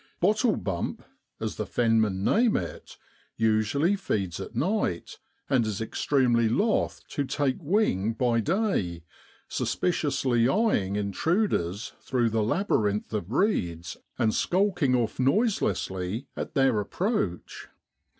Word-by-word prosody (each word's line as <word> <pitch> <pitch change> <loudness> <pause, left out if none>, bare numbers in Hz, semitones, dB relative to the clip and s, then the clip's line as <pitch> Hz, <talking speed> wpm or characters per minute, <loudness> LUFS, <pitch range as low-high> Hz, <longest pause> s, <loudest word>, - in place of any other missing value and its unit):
' - - -41
Bottlebump,' 205 - 0 0.4
as - - -4
the - - -2
fen 115 -2 +2
men 95 -3 -1
name 230 - +3
it, - - -7 0.4
usually 115 - +2
feeds 100 - -2
at - - -7
night, 180 - -1 0.3
and 130 -4 +3
is 110 -3 -3
extremely 120 0 +1
loth 210 - 0
to 145 - -1
take 140 -1 -1
to - - -18
wing 130 - +1
by 120 0 +1
day, 115 - 0 0.4
suspiciously 135 -8 0
eyeing 160 - +1
intruders 105 - -1
through 120 -3 0
the 110 0 +1
labyrinth 105 - 0
of 105 -2 -3
reeds, 85 - 0 0.2
and 110 - +2
skulking 175 -8 +2
off 115 -2 -1
noiselessly 130 - 0
at - - -5
their 135 -5 +3
approach. 105 - -2
120 Hz, 120 wpm, -27 LUFS, -, 0.4 s, name